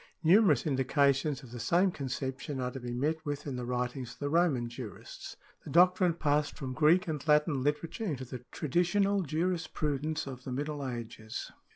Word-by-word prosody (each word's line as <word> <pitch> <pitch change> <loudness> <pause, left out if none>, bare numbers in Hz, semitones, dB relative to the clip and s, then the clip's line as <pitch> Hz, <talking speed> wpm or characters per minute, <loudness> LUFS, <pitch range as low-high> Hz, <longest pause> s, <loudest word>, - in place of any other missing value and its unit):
Numerous 170 - +5
indications 140 0 +2
of 120 - -12
the 120 - -7
same 180 - +3
conception 135 0 -4
are 125 0 -2
to 135 - -6
be 120 -1 -5
met 150 +6 -1
with 145 -1 -4
in 140 -3 -3
the 125 -1 -4
writings 125 0 -2
of - - -19
the 145 - -2
Roman 155 -7 +2
jurists.^ 120 -2 -8 0.3
The - - -9
doctrine 180 0 +4
passed 150 -2 0
from 130 -2 -4
Greek 160 +6 +4
and 155 -3 -3
Latin 150 -2 +3
literature 150 - -1
into 135 -9 -3
tlie 125 0 -8
traditional 185 +6 +1
jurisprudence 155 -2 -1
of 130 -2 -8
the 130 - -6
Middle 145 +2 -3
Ages. 115 -2 -6
145 Hz, 175 wpm, -31 LUFS, 130-160 Hz, 0.3 s, Numerous